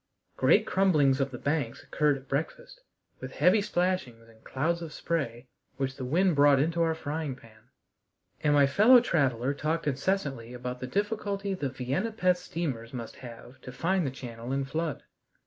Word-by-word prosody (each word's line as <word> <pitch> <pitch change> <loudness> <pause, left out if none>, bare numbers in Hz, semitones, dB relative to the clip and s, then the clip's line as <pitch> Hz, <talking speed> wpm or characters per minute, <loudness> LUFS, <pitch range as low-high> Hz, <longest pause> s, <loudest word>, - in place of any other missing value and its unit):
Great - - +4
crumblings 150 -9 +3
of 135 - 0
the 125 - -7
banks 140 -3 -2
occurred 150 -2 +1
at 135 0 -15
breakfast, 160 - -4 0.4
with - - -8
heavy 195 +4 +4
splashings 175 - -2
and 110 -1 -21
clouds 170 +6 -1
of 165 -2 -6
spray 135 -8 -3 0.3
which 135 -1 -2
the 135 - -6
wind 170 +7 +2
brought 145 -1 +5
into 165 +4 +1
our 165 -1 +2
frying 155 -2 -4
pan, 115 -1 -19 0.7
and 145 -1 +3
my 145 -1 +6
fellow 215 - +6
traveler 140 - +1
talked 155 +3 -2
incessantly 140 -5 -2
about 125 0 -5
the 130 - -5
difficulty 200 - -2
the 145 -7 -2
Vienna 135 - -2
Pesth 185 -4 +2
steamers 135 -9 -4
must 115 -2 -7
have 120 +1 -12
to 125 - -9
find 180 +8 0
the 140 - -1
channel 120 -2 -8
in 135 0 -1
flood. 155 +1 -3
145 Hz, 170 wpm, -28 LUFS, 125-170 Hz, 0.7 s, my